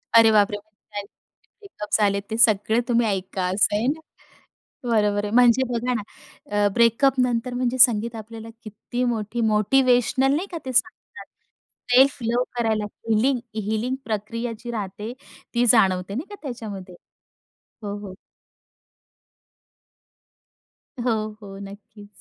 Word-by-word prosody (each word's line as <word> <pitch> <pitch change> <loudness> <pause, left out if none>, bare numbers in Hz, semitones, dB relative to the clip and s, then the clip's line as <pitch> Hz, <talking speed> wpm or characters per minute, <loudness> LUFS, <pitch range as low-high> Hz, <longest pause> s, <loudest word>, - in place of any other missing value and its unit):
अरे 225 -1 +8
बापरे, 205 -1 +3
म्हणजे 205 0 -10 0.6
ब्रेकअप्स 220 - -3
आलेत, 200 -1 +2
ते 220 - -1
सगळं 220 0 +4
तुम्ही 235 -1 +2
ऐका, 190 -2 -2
असं 205 +1 +2
आहे 225 +4 0
ना, 310 +3 0 0.9
बरोबर 210 -2 +2
आहे. 205 - -4
म्हणजे 245 +1 +5
बघा 245 +2 -1
ना, 225 - -1 0.5
अ, 205 0 +3
ब्रेकअपनंतर 245 +1 +2
म्हणजे 250 0 -1
संगीत 235 -2 +4
आपल्याला 225 +1 -9
किती 230 +3 -5
मोठी 235 -1 -2
मोटिवेशनल 255 +4 +3
नाही 360 +6 -2
का, 345 - -4
ते 260 - -4
सांगतात. 460 - -2 0.7
सेल्फ 265 +3 +5
लव्ह 235 +2 +1 0.2
करायला, 220 -2 0 0.2
हीलिंग 245 +4 +2 0.2
हीलिंग 220 +4 -1
प्रक्रिया 230 +2 -3
जी 240 - -6
राहते, 210 +1 -5 0.4
ती 240 +1 +3
जाणवते 195 -5 +3
नाही 285 - -4
का 410 - -8
त्याच्यामध्ये? 210 -9 -7 0.9
हो, 205 -1 -4
हो. 185 - -9 2.9
हो, 220 -3 0
हो. 195 -1 -10
नक्कीच. 205 +1 -12
225 Hz, 125 wpm, -23 LUFS, 205-245 Hz, 2.9 s, अरे